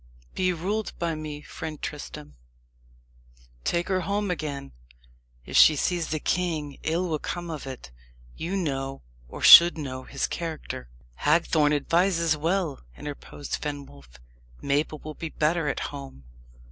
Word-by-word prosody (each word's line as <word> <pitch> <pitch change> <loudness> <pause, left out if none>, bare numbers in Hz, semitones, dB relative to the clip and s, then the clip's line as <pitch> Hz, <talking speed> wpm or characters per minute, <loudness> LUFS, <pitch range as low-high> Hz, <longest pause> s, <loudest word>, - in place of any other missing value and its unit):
Be 185 -1 +1
ruled 200 +6 -2
by 170 -1 -1
me, 155 -1 -6
friend 155 0 -7
Tristram 75 - -7 1.3
take 170 0 0
her 185 -1 +1
home 200 +2 -1
again. 145 -5 -4 0.7
If - - -7
she 155 - +8
sees 170 +3 0
the 155 - -2
king, 155 -5 -1
ill 170 +3 0
will 155 -3 -1
come 175 +2 -4
of 150 -3 -6
it. 130 - -8 0.4
You 175 +4 -3
know, 135 -6 -3 0.2
or - - -9
should 170 0 +11
know, 130 -4 -5
his 135 - -2
character." 160 - -5 0.3
"Hagthorne 150 - +3
advises 165 +2 +2
well," 165 -1 -1 0.2
interposed 145 0 -6
Fenwolf. 70 - -7 0.4
"Mabel 145 +2 0
will 155 - -6
be 165 +1 -6
better 155 +1 +1
at - - -1
home." 135 - -9
155 Hz, 135 wpm, -26 LUFS, 140-170 Hz, 1.3 s, should